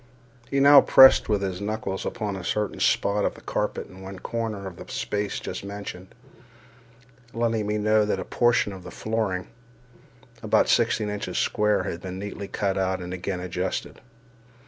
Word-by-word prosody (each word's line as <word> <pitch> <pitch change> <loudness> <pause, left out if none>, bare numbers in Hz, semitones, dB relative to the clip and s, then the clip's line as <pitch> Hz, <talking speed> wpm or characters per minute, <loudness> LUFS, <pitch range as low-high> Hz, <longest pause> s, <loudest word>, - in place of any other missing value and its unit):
He 140 - +1
now 140 0 +9
pressed 130 -3 +7
with 105 -2 +1
his 95 -1 -3
knuckles 100 -2 -3
upon 105 -2 -3
a 95 - -7
certain 105 +3 -2
spot 100 +1 +2
of - - -1
the - - -14
carpet - - -3
in 95 0 -14
one 95 0 -8
corner 110 -1 -4
of 90 -3 -8
the - - -10
space 105 0 -2
just - - -6
mentioned, 100 -2 -7 1.3
letting 115 -2 0
me 105 0 0
know 110 0 +3
that 105 - -1
a - - -4
portion 120 -4 +2
of 95 - -9
the - - -10
flooring, 110 -5 -2 0.9
about - - +2
sixteen 105 - +2
inches 105 0 -4
square, 105 -2 +1
had 90 -2 -5
been 95 -1 -6
neatly 100 0 -6
cut 95 -1 -1
out 95 0 0
and 90 0 -6
again 90 0 -3
adjusted. 90 +1 -4
100 Hz, 170 wpm, -25 LUFS, 95-110 Hz, 1.3 s, now